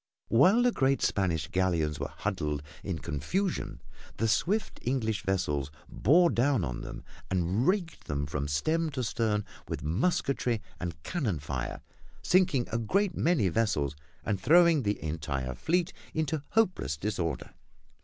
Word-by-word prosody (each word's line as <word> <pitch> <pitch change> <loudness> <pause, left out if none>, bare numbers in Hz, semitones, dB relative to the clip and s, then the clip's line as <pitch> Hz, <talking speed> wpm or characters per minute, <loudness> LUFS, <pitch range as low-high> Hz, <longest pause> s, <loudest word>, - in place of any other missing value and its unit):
While 185 - +5
the 245 - +4
great 135 - +1
Spanish 85 -7 +1
galleons 85 -5 0
were - - -3
huddled 75 -5 -2 0.2
in 95 -5 -2
confusion 85 - -2 0.3
the 115 - +1
swift 180 - 0
English 115 -4 -1
vessels 75 -7 -1 0.2
bore 170 - +4
down 130 -3 +2
on - - -4
them - - -7 0.3
and 95 - +1
raked 185 -3 0
them 70 -1 -2
from 70 0 -3
stem 155 - +1
to 130 - -2
stern 105 -2 0 0.2
with - - -4
musketry 120 - +1 0.2
and 85 -4 -5
cannon 130 - -1
fire, 65 -3 -4 0.4
sinking 175 -9 +3
a 115 - 0
great 185 - +1
many 160 - +2
vessels 80 -8 0 0.3
and 100 -3 -1
throwing 170 - +6
the 105 -3 -1
entire 75 -5 -3
fleet 170 - 0 0.2
into 155 -1 0
hopeless 185 - +1
disorder. 85 -3 -3
110 Hz, 140 wpm, -29 LUFS, -, 0.4 s, throwing